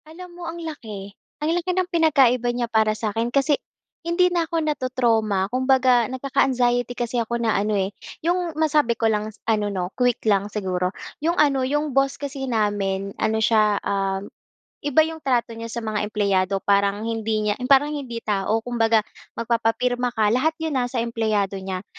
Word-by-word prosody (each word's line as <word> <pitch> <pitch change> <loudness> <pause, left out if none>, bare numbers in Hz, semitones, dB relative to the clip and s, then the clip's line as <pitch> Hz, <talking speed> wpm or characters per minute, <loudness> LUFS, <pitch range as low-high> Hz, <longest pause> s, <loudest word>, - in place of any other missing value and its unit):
Alam 350 +3 -11
mo 350 0 -10
ang 335 - -7
laki, 220 - -7 0.3
ang - - +1
laki 350 +1 -1
ng 370 - +2
pinagkaiba 270 -7 +4
niya 240 0 -1
para 220 -2 +1
sa'kin 225 +2 -1
kasi 275 +3 +2 0.4
hindi 355 +1 +2
na 335 -2 0
ako 335 - -1
nato-trauma. 235 -8 +1
Kumbaga 255 -2 +3
nagkaka-anxiety 250 -2 0
kasi 240 0 -1
ako 235 +1 -2
na 230 -2 +1
ano, 205 +1 +1
eh, 195 +1 -1 0.3
yung 345 -2 0
masabi 300 -7 +2
ko 230 - -1
lang 215 -1 +1 0.2
ano 215 -2 +1
'no, 185 -2 -3
quick 245 -2 +1
lang 205 -1 +2
siguro. 185 -3 -1 0.3
Yung 335 +3 0
ano, 280 -3 +3
yung 295 +2 -1
boss 275 +1 +2
kasi 275 -2 -5
namin 200 -3 -1
ano 220 0 +1
siya, 215 -2 +3
um, 195 0 -1 0.6
iba 290 +2 +4
yung 320 0 -5
trato 250 -5 0
niya 230 0 -6
sa 235 0 -5
mga 215 -1 -2
empleyado 195 -2 0
parang 200 +1 +2
hindi 220 -1 -1
niya 210 -1 0
yung 250 - -3
parang 280 +2 +5
hindi 255 -6 -5
tao. 210 +2 0
Kumbaga 225 -2 +2 0.3
magpapapirma 240 +2 0
ka 215 -2 +2
lahat 310 +7 +2
yun 305 -5 0
ha 245 - 0
sa 245 -2 -2
empleyado 215 -4 -1
niya. 190 -1 -5
235 Hz, 175 wpm, -23 LUFS, 210-275 Hz, 0.6 s, parang